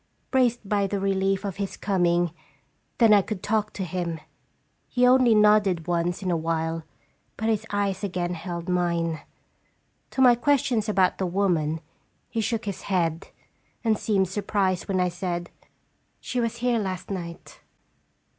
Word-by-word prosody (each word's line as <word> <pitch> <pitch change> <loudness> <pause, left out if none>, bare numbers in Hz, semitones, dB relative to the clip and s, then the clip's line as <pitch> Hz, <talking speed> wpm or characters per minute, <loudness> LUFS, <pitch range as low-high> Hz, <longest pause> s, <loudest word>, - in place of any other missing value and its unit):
Braced 245 -5 +2
by 200 -1 +1
the 200 +1 -2
relief 195 0 0
of 195 -3 -4
his 200 -1 -4
coming, 175 -3 +1 0.7
then 225 -3 +6
I 205 - +7
could 195 -1 -5
talk 215 0 0
to 195 - -4
him. 170 -2 -3 0.7
He 250 0 +2
only 250 -2 +5
nodded 210 -5 +4
once 175 +2 -1
in 185 - 0
a - - +2
while, 165 0 -1 0.6
but 220 +1 -1
his 220 -2 0
eyes 200 -1 -1
again 180 -2 -2
held 170 0 -5
mine. 170 -3 0 0.9
To - - -7
my 250 -1 +8
questions 240 -3 +1
about 190 -3 +2
the 190 - 0
woman, 170 -4 0 0.5
he 225 - -1
shook 220 0 -2
his 200 -3 -4
head, 170 -4 0 0.6
and 225 -2 +3
seemed 200 -3 +1
surprised 190 -1 -1
when 190 -2 0
I 180 0 +2
said, 175 -1 -4 0.3
" - - -44 0.3
She 250 - -3
was 230 0 -1
here 240 -2 +3
last 185 -2 -4
night. 170 -3 -7
195 Hz, 155 wpm, -25 LUFS, 175-215 Hz, 0.9 s, my